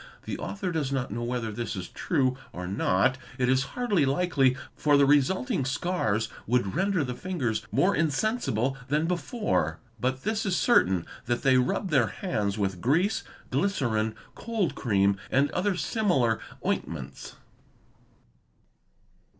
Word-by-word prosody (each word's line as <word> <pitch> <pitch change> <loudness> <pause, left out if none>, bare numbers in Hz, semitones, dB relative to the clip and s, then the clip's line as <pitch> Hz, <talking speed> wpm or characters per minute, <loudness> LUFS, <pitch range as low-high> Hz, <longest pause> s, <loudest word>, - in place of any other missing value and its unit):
The - - -5
author 200 -2 -3
does 150 -5 -1
not 135 -4 -1
know 115 +3 -3
whether 120 -2 -2
this 115 +1 -4
is 90 -2 -5
true 130 -7 0 0.2
or 90 0 -5
not; 100 +6 +2 0.2
it 125 -2 +1
is 130 +1 +3
hardly 230 -10 +2
likely, 135 -2 +2 0.2
for 145 -1 +3
the 140 - +6
resulting 150 - +2
scars 135 - 0 0.2
would 120 -4 +1
render 190 -2 +1
the 125 -2 -3
fingers 125 -9 -2
more 195 +2 +3
insensible 150 - 0
than 150 +3 +1
before. 195 +6 -1 0.2
But 130 +3 -1
this 220 +1 0
is 190 -3 0
certain 95 - +3 0.2
that 120 0 0
they 130 -1 +5
rub 145 +9 0
their 130 -6 +4
hands 105 - -2
with 95 -4 -1
grease, 170 - +2 0.3
glycerine, 110 - 0 0.2
cold 225 -6 -1
cream, 100 -4 +2
and 140 +2 +2
other 190 +1 0
similar 155 - +1 0.3
ointments. 70 -5 -3
135 Hz, 140 wpm, -27 LUFS, 115-180 Hz, 0.3 s, the